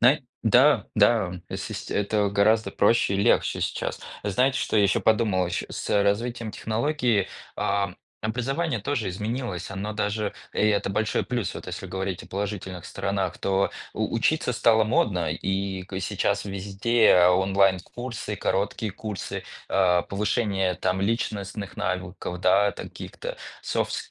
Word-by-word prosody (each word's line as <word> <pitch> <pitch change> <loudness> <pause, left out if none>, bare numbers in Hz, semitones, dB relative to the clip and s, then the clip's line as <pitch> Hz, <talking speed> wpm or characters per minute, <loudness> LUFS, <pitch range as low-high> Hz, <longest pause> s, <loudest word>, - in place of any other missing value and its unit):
Знае 130 +3 +5 0.2
да 125 +6 +5
да, 105 -4 +4 0.2
эсист - - -5
это 105 0 +1
гораздо 100 +1 +3
проще 100 -1 +3
и - - +1
легче 100 - +2
сейчас. - - -2 0.2
Знаете, 125 +7 +2
что - - 0
я 105 - +5
ещё 100 - +2
подумал, 105 -5 +2
э, - - -5
щас? - - -4
С 100 - +1
развитием 115 +2 0
технологии, 120 -2 0 0.3
ам, 100 -2 0 0.2
образование 125 +6 -1
тоже 120 -4 -1
изменилось. 105 -2 -3
Оно 100 +2 -4
даже 105 0 -1 0.2
и - - -5
это 105 -2 +2
большой 105 +2 0
плюс, 120 -7 -2
вот - - -8
если - - -5
говорить 95 -1 -3
о - - -12
положительных 95 -3 -4
сторонах, 95 -3 -2
то 100 0 +1 0.2
у - - -2
учиться 155 +4 +1
стало 110 -1 +4
модно. 95 -7 +1
И 95 +2 -2
к 95 - -20
и 95 - -2
сейчас 100 +1 0
везде 100 0 +3
онлайн-курсы, 95 +4 +1
короткие 100 +3 -1
курсы, 105 -2 -5 0.3
э, 90 -2 +3
повышение 100 -2 0
там 95 +1 -1
личностных 100 -1 -2
навыков, 90 -1 -3
да, 100 +3 +4
каких-то, - - -7 0.3
софт - - -1
ски 445 0 -5
100 Hz, 145 wpm, -26 LUFS, 95-115 Hz, 0.3 s, Знае